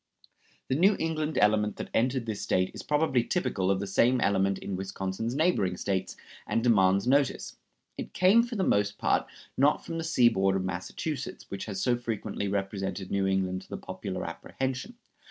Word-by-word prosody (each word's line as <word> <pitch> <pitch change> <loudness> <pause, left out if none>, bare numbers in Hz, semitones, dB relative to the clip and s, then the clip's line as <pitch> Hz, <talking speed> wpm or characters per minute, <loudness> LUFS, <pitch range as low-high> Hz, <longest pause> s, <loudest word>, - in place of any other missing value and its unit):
The - - 0
New 190 +9 +4
England 155 -1 -2
element 105 0 +3
that - - -7
entered 125 +1 +1
this 110 -3 -4
State 95 0 +1
is - - -7
probably 150 -5 +1
typical 100 - -1
of 95 -1 +2
the 100 - -3
same 120 +6 +3
element 100 -2 +2
in 100 - -5
Wisconsin's 95 +4 -3
neighboring 140 - +1
States, 95 -2 -2 0.3
and 115 - 0
demands 100 -4 +4
notice. 135 +1 +1 0.4
It - - -5
came 190 +6 +5
for 240 0 -4
the 195 - 0
most 100 - +1
part, - - +1 0.3
not 140 +3 +2
from 165 -1 -4
the - - -3
seaboard 120 - +3
of 95 -1 -1
Massachusetts, 110 - -4
which 100 - -4
has 95 -3 -4
so 125 - +3
frequently 110 -3 -3
represented 95 -1 -3
New 100 -1 +1
England 95 -1 0
to - - -17
the - - -5
popular - - -5
apprehension. 130 - -4
105 Hz, 175 wpm, -28 LUFS, 95-140 Hz, 0.4 s, came